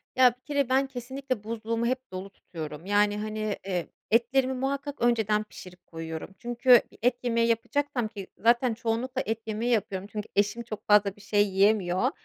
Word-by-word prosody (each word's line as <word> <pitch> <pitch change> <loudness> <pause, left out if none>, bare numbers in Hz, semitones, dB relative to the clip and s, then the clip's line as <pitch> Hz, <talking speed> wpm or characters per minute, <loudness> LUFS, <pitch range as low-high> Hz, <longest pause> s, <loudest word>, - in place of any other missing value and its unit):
Ya, 250 -2 +6
bir - - -41
kere 285 -3 0
ben 270 +1 +3
kesinlikle 260 -2 -5
buzluğumu 230 +1 -2
hep 255 -3 -2
dolu 185 +2 -6
tutuyorum, 160 -3 -8
yani, 205 +1 +2
hani, 215 -1 -2
eee, 180 -3 -2 0.2
etlerimi 255 +3 +3
muhakkak 275 +2 -3
önceden 220 -3 +2
pişirip 180 -3 -13
koyuyorum, 165 +1 -6
çünkü 240 +1 +5 0.2
et 245 +1 +2
yemeği 230 -1 +2
yapacaksam 245 +1 0
ki, 200 -3 -8
zaten 235 +2 +3
çoğunlukla 235 +3 -2
et 225 +1 -1
yemeği 225 +3 -1
yapıyorum. 200 -3 -1
Çünkü 210 -1 -5
eşim 205 +4 +1
çok 215 -2 -8
fazla 205 -2 +4
bir 205 - -17
şey 205 0 +2
yiyemiyor. 195 +3 +2
225 Hz, 165 wpm, -27 LUFS, 205-250 Hz, 0.2 s, Ya